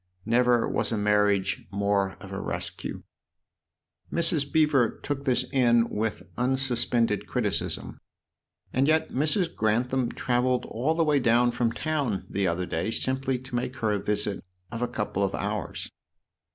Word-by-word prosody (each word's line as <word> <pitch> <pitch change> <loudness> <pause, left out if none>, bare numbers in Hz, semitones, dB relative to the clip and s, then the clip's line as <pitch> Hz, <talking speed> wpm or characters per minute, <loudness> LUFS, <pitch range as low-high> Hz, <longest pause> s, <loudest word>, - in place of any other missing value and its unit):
Never 120 +1 +3
was - - -1
a 115 - 0
mar 105 0 +3
riage 100 -1 0
more 100 -1 +1
of - - -10
a - - -4
rescue." - - -5 1.1
Mrs. 160 -4 +2
Beever 150 -7 +4
took 140 -1 -3
this 125 -1 +2
in 120 -3 +4
with 110 0 -2 0.2
unsuspended 125 -4 +1
criticism. - - -2 0.7
"And 135 +2 +2
yet 160 +1 +2
Mrs. 155 +6 0
Grantham 120 +3 +1
travelled 125 0 0
all 140 +8 -1
the 165 - +3
way 150 -2 +3
down 120 0 +3
from 120 -1 0
town 140 -9 -2
the 100 -1 0
other 90 +2 -1
day 85 +4 -2
simply 130 +2 0
to 130 -1 -13
make 125 +1 -2
her 110 -4 0
a 105 - 0
visit 105 -1 -2 0.3
of 115 0 -5
a 125 - +1
couple 105 -4 -3
of 100 -1 0
hours." 105 -1 -4
120 Hz, 150 wpm, -27 LUFS, 105-130 Hz, 1.1 s, Beever